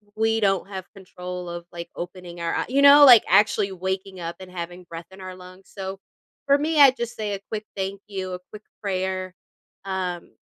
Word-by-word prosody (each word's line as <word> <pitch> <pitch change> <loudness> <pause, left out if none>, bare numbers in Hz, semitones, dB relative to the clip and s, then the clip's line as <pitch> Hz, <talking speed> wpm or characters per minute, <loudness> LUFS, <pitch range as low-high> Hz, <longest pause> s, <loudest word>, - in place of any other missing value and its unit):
we 225 0 +1
don't 195 -3 +1
have 190 -2 -6
control 180 -2 -7
of, 170 0 -7
like, 170 0 -8
opening 175 0 -8
our 170 0 -1
eye - - -1
you 275 +2 +2
know, 285 +1 +9
like, 245 -4 +9
actually 200 +1 +4
waking 190 0 -4
up 170 0 -5
and 185 -1 -11
having 175 0 -7
breath 165 0 -8
in 190 0 -13
our 185 0 -7
lungs, 185 +1 -15
so, 195 -1 -5 0.5
for 280 0 +5
me, 305 +2 0
I 280 -2 +9
just 240 -2 -5
say 210 -2 -2
a 200 - -4
quick 215 -1 -4
thank 195 0 -3
you, 190 -2 -5
a 180 - -5
quick 210 - -9 0.2
prayer. 185 -2 -2 0.5
Um, 185 -2 -4
190 Hz, 200 wpm, -24 LUFS, 180-210 Hz, 0.5 s, know